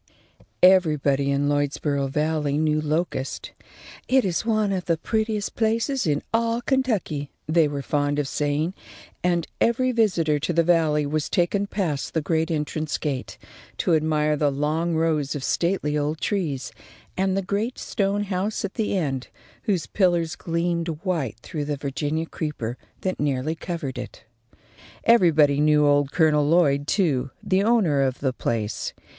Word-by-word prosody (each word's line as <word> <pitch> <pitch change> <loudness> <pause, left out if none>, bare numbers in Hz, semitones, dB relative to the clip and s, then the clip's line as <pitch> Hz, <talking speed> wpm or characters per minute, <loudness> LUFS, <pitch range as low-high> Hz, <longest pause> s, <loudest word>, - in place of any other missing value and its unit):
Everybody, 150 -7 +4
in 140 +1 +1
Lloydsboro 145 -1 0
Valley 150 0 0
knew 155 0 +1
Locust. 150 -3 -2 0.6
"It 260 -2 +3
is 180 -3 0
one 215 -2 +1
of 185 -2 -2
the 165 -2 +1
prettiest 220 +2 -1
places 230 - 0
in 145 -2 0
all 230 +1 +1
Kentucky," 225 - -1 0.2
they 160 0 +4
were 140 -1 -4
fond 145 0 0
of 145 -2 0
saying, 150 +5 -1 0.5
and 175 -2 +1 0.2
every 255 +2 +2
visitor 180 -10 +2
to 170 +4 -1
the 170 0 +3
Valley 160 -3 +2
was 150 +1 -1
taken 195 +3 +1
past 170 -10 -2
the 160 - +2
great 160 +1 0
entrance 155 -1 -2
gate 140 -4 -4 0.4
to 175 - +1
admire 155 -1 +2
the 150 0 +2
long 155 +4 0
rows 155 -3 0
of 140 - -4
stately 170 -3 0
old 150 +1 -1
trees, 160 -10 -2 0.4
and 190 0 +1
the 195 - 0
great 205 +6 -2
stone 200 0 -1
house 200 +2 -2
at 195 - -6
the 210 -3 -1
end, 135 -7 -2 0.4
whose 190 -6 0
pillars 175 -4 +1
gleamed 170 0 -1 0.2
white 155 - -1
through 150 -4 -4
the 145 0 -2
Virginia 145 +3 -2
creeper 150 -8 -4 0.3
that 185 -1 -2
nearly 145 +1 0
covered 165 -5 -5
it. - - -8 0.8
Everybody 160 -11 +5
knew 150 0 +4
old 145 -1 +3
Colonel 155 -3 +3
Lloyd, 145 -4 +3
too, 150 -11 +1
the 190 0 +2
owner 205 -11 +3
of 130 -1 0
the 135 -2 0
place. 110 -3 -2
160 Hz, 150 wpm, -24 LUFS, 145-185 Hz, 0.8 s, Everybody